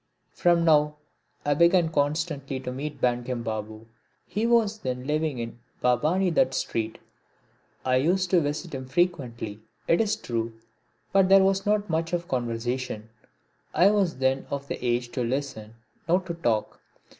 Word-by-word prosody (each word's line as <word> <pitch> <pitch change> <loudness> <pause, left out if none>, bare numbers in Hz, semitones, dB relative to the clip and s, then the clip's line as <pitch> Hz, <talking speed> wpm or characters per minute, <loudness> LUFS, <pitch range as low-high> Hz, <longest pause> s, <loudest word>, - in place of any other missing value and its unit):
From 170 -1 +3
now 150 -2 +4 0.5
I 145 - +3
began 170 +2 +4
constantly 145 -2 -1
to 125 - -4
meet 140 +2 -5
Bankim 120 -1 0
Babu. 110 0 -5 0.4
He 215 +3 -1
was 225 -3 +3
then 125 -4 -4
living 150 -1 0
in 115 0 -6 0.2
Bhabani 155 +10 +2
Dutt's 130 -4 +2
street. 110 -1 -2 0.9
I 130 0 +3
used 180 +6 +1
to 180 -3 +5
visit 150 +3 -3
him 130 -1 -5
frequently, 130 - -1 0.3
it 165 - +4
is 215 -2 +1
true, 115 -1 -3 0.6
but 195 -1 +5
there 195 0 +7
was 195 +1 +1
not 210 0 +2
much 165 +1 -1
of 175 0 -1
conversation. 120 -2 -3 0.7
I 195 +3 +6
was 195 -7 +1
then 130 +1 0
of 140 0 -4
the - - -5
age 120 0 0
to 125 0 -2
listen, 120 -4 -3 0.3
not 180 +2 +3
to 175 - -3
talk. 120 -10 -1
145 Hz, 155 wpm, -26 LUFS, 125-175 Hz, 0.9 s, there